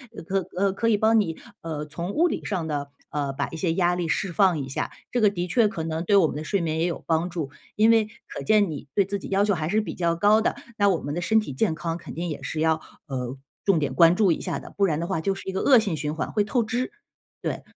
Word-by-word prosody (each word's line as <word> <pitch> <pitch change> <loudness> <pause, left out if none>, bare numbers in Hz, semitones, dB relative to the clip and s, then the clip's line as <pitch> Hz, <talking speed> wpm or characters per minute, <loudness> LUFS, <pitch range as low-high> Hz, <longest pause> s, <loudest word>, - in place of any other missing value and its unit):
呃， - - -7
可 190 +2 -1
呃， 195 0 +3
可 230 +4 -1
以 220 - +4
帮 220 +2 +4
你， 165 -6 -1 0.3
呃， 155 -2 -4
从 170 +5 -5
物 345 +3 +3
理 - - -4
上 185 -6 -2
地， 145 -1 -2 0.2
呃， 140 -2 -2
把 - - -2
一 165 - -7
些 165 -1 0
压 175 0 +2
力 175 -2 -2
释 190 +3 -1
放 185 -2 +3
一 135 -2 -4
下， - - -3 0.2
这 245 - +1
个 210 - +5
的 180 -2 -3
确 225 +4 +4
可 175 -6 -4
能 160 +1 -3
对 200 - +3
我 195 -4 +6
们 150 - -2
的 155 - -5
睡 200 -3 0
眠 160 -1 -1
也 165 - +2
有 175 - -3
帮 165 +2 +1
助。 165 -5 -4 0.3
因 215 +1 +5
为 225 -2 +4 0.2
可 - - -6
见 210 -5 +3
你 145 -1 -7
对 200 - +5
自 200 +1 -3
己 - - -8
要 195 +1 +2
求 205 0 +2
还 160 -4 -2
是 210 +6 +2
比 210 - -5
较 170 -1 0
高 205 +5 +5
的， 220 - 0 0.2
那 205 -1 +4
我 185 -4 +2
们 145 - -4
的 175 - -2
身 220 +5 +2
体 210 - -6
健 160 +5 0
康 165 +2 -3
肯 - - -10
定 175 +1 -3
也 150 -3 -5
是 155 +4 -3
要， 160 0 +4 0.3
呃， 130 -1 -4 0.3
重 195 -4 +4
点 140 -3 -1
关 165 +5 +6
注 195 -2 +4
一 - - 0
下 - - -2
的， - - -12
不 200 - +3
然 155 -3 0
的 170 - -2
话 190 -4 -1
就 195 +3 0
是 195 - -10
一 - - -1
个 190 - -1
恶 265 - +6
性 200 -7 -1
循 150 0 -3
环， 160 - -3
会 210 - +2
透 235 +4 +1
支， 245 - -2 0.5
对。 - - -3
175 Hz, 310 characters per minute, -25 LUFS, 160-205 Hz, 0.5 s, 我